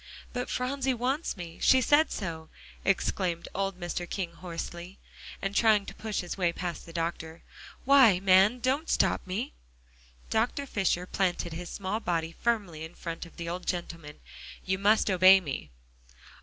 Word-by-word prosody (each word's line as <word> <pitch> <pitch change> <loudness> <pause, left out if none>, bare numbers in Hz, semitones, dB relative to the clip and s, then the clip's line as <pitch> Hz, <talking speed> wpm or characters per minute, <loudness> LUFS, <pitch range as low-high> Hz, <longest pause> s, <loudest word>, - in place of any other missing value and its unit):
"But 250 0 -3
Phronsie 265 +1 -1
wants 260 +3 -1
me; 170 -2 -8
she 260 - +6
said 290 +5 +4
so," 160 -5 -5 0.3
exclaimed 185 -3 0
old 195 -1 -2
Mr. 175 0 -4
King 180 -4 -3
hoarsely, 175 +1 -7 0.5
and 195 0 -1
trying 215 -3 +4
to - - -8
push 215 -1 -3
his 180 +2 -6
way 175 -2 +2
past 170 -1 -5
the - - -9
doctor. 165 -1 -4 0.4
"Why, 260 -9 +6
man, 195 +4 +5
don't 275 +6 0
stop - - +2
me." 215 +9 -3 0.8
Dr. 245 +6 0
Fisher 190 -7 0
planted 180 -3 -1
his 175 +1 -6
small 200 +2 -3
body 165 -6 -1
firmly 195 -7 -2
in 160 +2 -9
front 165 0 -6
of - - -19
the 170 - -5
old 180 +1 -5
gentleman. 170 -4 -5 0.4
"You 190 0 0
must 205 +1 +3
obey 185 +1 +7
me." 145 -8 -5
185 Hz, 155 wpm, -29 LUFS, 170-220 Hz, 0.8 s, obey